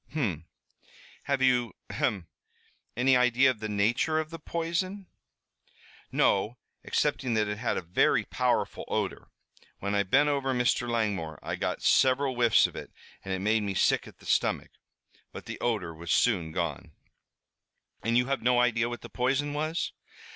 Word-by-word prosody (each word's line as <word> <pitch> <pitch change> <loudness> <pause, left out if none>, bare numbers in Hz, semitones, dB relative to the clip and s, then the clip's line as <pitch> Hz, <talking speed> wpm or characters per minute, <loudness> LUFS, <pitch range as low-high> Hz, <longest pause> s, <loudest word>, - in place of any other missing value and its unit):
"Hum. 95 - -1 0.8
Have 140 -1 0
you 125 -3 +2 0.2
ahem! 95 -5 -1 0.7
any 130 +1 +4
idea 125 +1 +4
of 115 - -9
the 110 0 -4
nature 110 +10 +1
of 155 0 -4
the 165 - -7
poison?" 170 +5 -3 1.1
"No, 105 +5 +2 0.3
excepting 125 -4 0
that 105 -1 +2
it 105 +1 -4
had 120 - -1
a - - -3
very 85 +2 +2
powerful - - -1
odor. - - -2 0.5
When 100 +1 -3
I 100 - +3
bent 135 +10 +3
over 135 -2 0
Mr. 125 0 +1
Langmore 100 -9 -1
I - - -3
got - - -3
several 130 +1 +3
whiffs 120 -2 +4
of - - -4
it - - -8 0.3
and 95 - -6
it 95 0 -2
made 110 +2 +2
me 100 -2 -3
sick - - +2
at - - -14
the - - -18
stomach. - - 0 0.6
But - - -9
the - - -7
odor 105 -8 -1
was 85 +2 -6
soon 90 -10 +2
gone." 85 -4 -4 1.1
"And 115 +2 +1
you 125 - +3
have 135 +1 -1
no 125 +1 +3
idea 120 -1 +2
what 120 - -6
the - - -9
poison 135 +3 0
was?" 155 +3 -2
120 Hz, 165 wpm, -28 LUFS, 105-135 Hz, 1.1 s, any